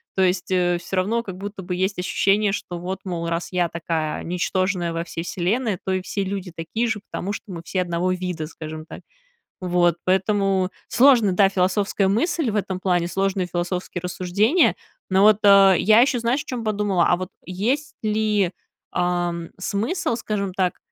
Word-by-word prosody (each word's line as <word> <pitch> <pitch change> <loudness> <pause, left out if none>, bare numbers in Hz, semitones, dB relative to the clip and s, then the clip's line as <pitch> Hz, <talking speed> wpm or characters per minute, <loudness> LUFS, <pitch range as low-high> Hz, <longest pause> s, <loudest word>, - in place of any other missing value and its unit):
То 190 - +1
есть, 180 0 0
э, 175 -1 +2
всё 185 - -5
равно 220 +6 +1
как 190 -4 -7
будто 200 0 -6
бы 180 0 -3
есть 190 +1 -1
ощущение, 200 +3 +2
что 175 -3 -4
вот, 185 +2 -4
мол, 170 -3 -3
раз 170 0 -2
я 180 -2 +1
такая 160 -2 -3
ничтожная 180 0 -1
во 165 - -2
всей 165 -1 -6
Вселенной, 200 +5 -1
то 190 - 0
и 185 - 0
все 200 +2 -3
люди 195 -1 -4
такие 220 +9 -2
же, 225 -3 -2
потому 200 +3 -3
что - - -7
мы 170 -2 -6
все 185 - -1
одного 175 +1 -1
вида, 180 -4 -4
скажем 155 0 -8
так. - - -10 0.6
Вот, 175 -2 +2
поэтому 190 0 +1 0.2
сложная, 240 -6 +5
да, 195 +1 +5
философская 195 +1 +1
мысль 285 - +1
в 210 - -2
этом 190 -2 -2
плане, 175 -2 +1
сложные 195 +1 0
философские 180 +1 -3
рассуждения. 185 - +2 0.4
Но 190 +1 +4
вот, 210 0 +6
э, 195 -1 +7
я 215 +5 +5
ещё, 255 -1 +2
знаешь, 240 +5 0
о - - -25
чём 245 -4 -4
подумала: 205 -4 +1
а 175 - +4
вот 185 0 -5 0.2
есть 240 +12 -1
ли, 210 -3 +1 0.4
ам, 175 -1 -1
смысл, 230 - -1
скажем 200 -5 -3
так, 185 -2 0
190 Hz, 180 wpm, -23 LUFS, 175-205 Hz, 0.6 s, э